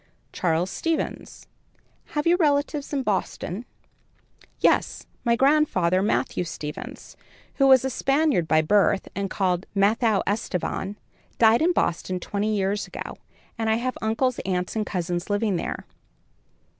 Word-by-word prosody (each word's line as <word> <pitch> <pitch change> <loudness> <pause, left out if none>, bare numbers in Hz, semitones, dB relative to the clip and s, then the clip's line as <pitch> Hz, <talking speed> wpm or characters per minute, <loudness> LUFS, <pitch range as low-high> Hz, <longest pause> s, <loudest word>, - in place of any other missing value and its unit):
"Charles 175 +1 0
Stevens." 330 -1 -3 0.7
"Have 295 - 0
you 340 +1 +5
relatives 290 -3 0
in 280 -2 -1
Boston?" 205 0 -2 0.9
"Yes, - - +1 0.2
my 235 -1 +3
grandfather, 235 - +3
Mathew 200 -3 0
Stevens, 150 -3 -7 0.4
who 275 - +4
was 265 -1 +6
a - - +1
Spaniard 275 - +1
by 155 0 +3
birth 200 +3 +2
and 195 -1 -2
called 185 -2 -1
Mattheo 210 +1 +2
Estevan, 200 -1 -2 0.4
died 225 +2 +5
in 340 +3 +4
Boston 185 - -1
twenty 210 +3 -1
years 200 +1 -1
ago, - - -7 0.4
and 225 -1 0
I 220 - +3
have 255 +2 -2
uncles, 225 +3 0
aunts 180 +1 -2
and 215 -1 -1
cousins 175 0 -3
living 205 -2 +1
there." - - -4
210 Hz, 130 wpm, -24 LUFS, 185-260 Hz, 0.9 s, was